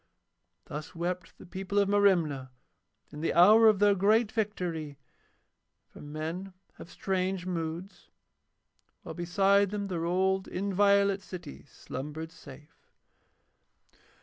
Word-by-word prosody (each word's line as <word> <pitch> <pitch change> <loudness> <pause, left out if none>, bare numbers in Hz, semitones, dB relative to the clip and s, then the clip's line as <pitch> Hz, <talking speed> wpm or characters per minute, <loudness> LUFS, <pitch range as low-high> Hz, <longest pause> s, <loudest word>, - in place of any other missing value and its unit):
Thus 150 +3 -8
wept 175 +2 -4
the - - -13
people 190 +2 -5
of 200 -1 +4
Merimna 175 -10 +2 0.6
in 150 0 -8
the 165 - -1
hour 215 +6 +7
of 215 -2 +5
their 205 +1 +4
great 210 +3 +2
victory, 175 - -3 0.9
for - - -14
men 160 +6 -6 0.2
have - - -11
strange 190 -1 -2
moods, 170 +1 -5 0.9
while - - -7
beside 195 +3 +2
them 200 0 -4
their 170 -3 -2
old 190 +2 +1
inviolate 200 +1 +2
city 75 - -10
slumbered 150 +5 -7
safe. 150 -1 -16
185 Hz, 115 wpm, -29 LUFS, 160-200 Hz, 0.9 s, hour